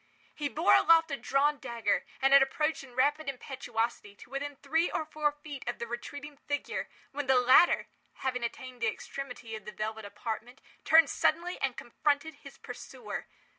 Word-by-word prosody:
He 295 -1 -2
bore 315 +6 +3
aloft 330 -1 +6
a - - 0
drawn 285 +1 +1
dagger, 235 -5 -1 0.2
and 270 0 +5
had 275 - +9
approached, 300 +3 0
in 250 -3 -14
rapid 290 +3 +2
impetuosity, 240 -5 -3
to 220 - -15
within 285 +1 -4
three 320 +5 +1
or 315 - -2
four 305 -1 0
feet 290 -2 -9
of - - -2
the 235 - -4
retreating 285 +5 -7
figure, 290 0 -3 0.2
when 285 0 -4
the 265 -1 +5
latter, 255 +7 +6 0.3
having 250 -2 -2
attained 250 +1 -6
the 230 - +2
extremity 250 -1 -5
of 215 -2 -9
the 210 - -6
velvet 220 0 -4
apartment, 225 +4 -6 0.3
turned 320 -2 +7
suddenly 345 +3 +1
and 270 -3 0
confronted 290 +5 0
his 275 - -12
pursuer. - - -7
275 Hz, 170 wpm, -30 LUFS, 240-295 Hz, 0.3 s, had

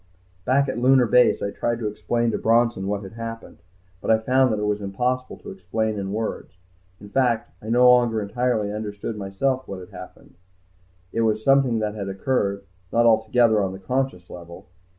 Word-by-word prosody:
Back 140 +2 +2
at 130 - -3
Lunar 130 0 +5
Base 125 +2 +3
I 100 - -2
tried 120 +3 -2
to 115 - -5
explain 115 +2 -1
to - - -2
Bronson 115 -4 +2
what 100 0 -2
had 95 - -9
happened. 115 0 -8 0.4
But - - -5
I 110 - +5
found 130 +3 +2
that 110 - 0
it 105 - -1
was 105 0 -1
impossible 125 +6 -2
to - - -8
explain 105 +3 -3
in 95 0 -4
words. 110 -3 -4 0.4
In 105 - -12
fact 120 0 0
I 110 - -8
no 125 +2 +5
longer 120 -3 +4
entirely 110 0 -1
understood, 105 +1 -5
myself, 125 +7 -2
what 100 -1 -6
had 90 - -11
happened. - - -12 0.8
It 115 - 0
was 110 -1 0
something 135 -3 +3
that 105 -1 -2
had 100 -2 -5
occurred 100 -1 -1 0.3
not 120 0 +3
altogether 110 0 +3
on 95 -1 -2
the - - -7
conscious 125 -3 -2
level. 85 -1 -11
110 Hz, 190 wpm, -23 LUFS, 100-125 Hz, 0.8 s, Lunar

